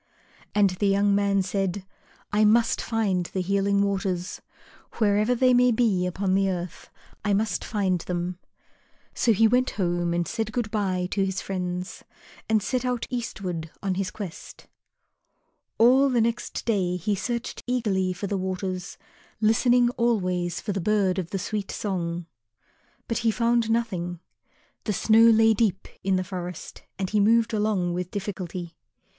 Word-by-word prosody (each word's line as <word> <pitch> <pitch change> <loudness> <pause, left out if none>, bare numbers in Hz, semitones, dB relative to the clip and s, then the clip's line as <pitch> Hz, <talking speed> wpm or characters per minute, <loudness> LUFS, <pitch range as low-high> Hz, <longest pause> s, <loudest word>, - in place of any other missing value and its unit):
And 205 -2 +4
the 190 +3 -1
young 200 +1 +3
man 200 -1 +2
said, 195 0 -2 0.5
"I 210 +1 +4
must 225 +2 +3
find 200 -6 0
the 190 - -3
Healing 200 +2 +1
Waters. 190 -2 -2 0.5
Wherever 215 +2 +2
they 255 +1 +4
may 250 0 +5
be 220 -6 +2
upon 185 +1 -1
the 195 0 +2
earth, 180 -1 -5 0.3
I 205 0 +1
must 215 +2 -1
find 195 -4 0
them." 175 0 -3 0.7
So 235 - +2
he 220 +1 +5
went 250 +3 +2
home 175 -2 0
and 175 0 0
said 220 -1 -3
good 225 -2 -2
bye 185 -4 0
to 195 - +1
his 190 -1 -1
friends, 180 -1 -4 0.5
and 215 -2 +3
set 255 +3 -1
out 250 -2 -1
eastward 185 -9 -4
on 195 -1 0
his 185 0 -2
quest. 190 -4 -9 1.1
All 260 +4 +5
the 250 -2 +2
next 230 +1 -1
day 190 -6 +1
he 185 +4 -1
searched 235 +4 -3
eagerly 205 -7 0
for 185 +3 -5
the 200 0 -2
Waters, 185 -1 -4 0.4
listening 240 +3 +4
always 185 -7 0
for - - -4
the 195 -1 -2
bird 195 -1 +1
of 175 -3 -4
the 195 - -2
sweet 205 +1 -3
song. 175 -4 -3 0.8
But 230 - -1
he 230 - +2
found 235 0 +1
nothing. 185 -7 -1 0.7
The 210 - 0
snow 225 +3 +5
lay 225 0 +5
deep 205 -3 0 0.2
in 195 0 +2
the 185 - 0
forest 180 -2 -7 0.2
and 190 -1 -3
he 210 - +2
moved 225 +2 +3
along 210 -5 0
with 180 0 -3
difficulty. 185 -4 -5
200 Hz, 155 wpm, -25 LUFS, 185-225 Hz, 1.1 s, may